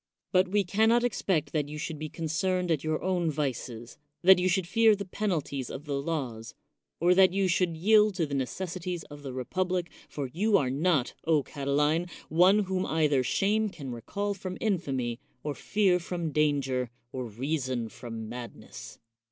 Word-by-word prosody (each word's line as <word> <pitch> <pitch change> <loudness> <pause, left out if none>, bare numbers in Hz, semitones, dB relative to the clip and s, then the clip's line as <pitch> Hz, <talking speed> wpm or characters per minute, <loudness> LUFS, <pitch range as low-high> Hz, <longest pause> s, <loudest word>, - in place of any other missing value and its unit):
But 185 0 +4
we 205 +2 +2
can 210 +5 +2
not 240 +1 +4
expect 185 -10 0
that 150 -2 -1
you 150 - -6
should 155 0 -5
be 155 0 -4
concerned 175 +3 -1
at 155 -4 +1
your 155 0 -1
own 180 -3 +1
vices, 125 -5 -4 0.2
that 190 0 +8
you 185 +1 +2
should 185 0 +1
fear 220 +4 +4
the 200 0 -5
penalties 170 - -2
of 145 - -7
the 145 - -3
laws, 130 -8 -4 0.4
or 175 +2 +5
that 185 0 +5
you 195 -1 +2
should 175 -2 +1
yield 210 +3 +4
to 170 -3 +1
the 145 - -6
necessities 175 +5 -3
of 145 0 -9
the 135 -2 -6
republic, 175 +7 -2 0.2
for 145 - -4
you 205 +4 +3
are 130 -7 0
not, 145 -2 +1
O 155 -3 +3
Catiline, 145 +5 0 0.2
one 185 +6 +5
whom 190 -1 -1
either 150 -4 +2
shame 210 - +1
can 140 -9 -7
recall 200 - -3
from 185 -1 -6
infamy, 135 - -1 0.2
or 150 - -2
fear 190 +1 +2
from 170 -2 -3
danger, 140 -5 +1 0.2
or 130 -1 -4
rea 130 +9 -2
son 125 -3 -2
from 115 0 -7
madness. 120 +1 -9
160 Hz, 175 wpm, -28 LUFS, 140-185 Hz, 0.4 s, that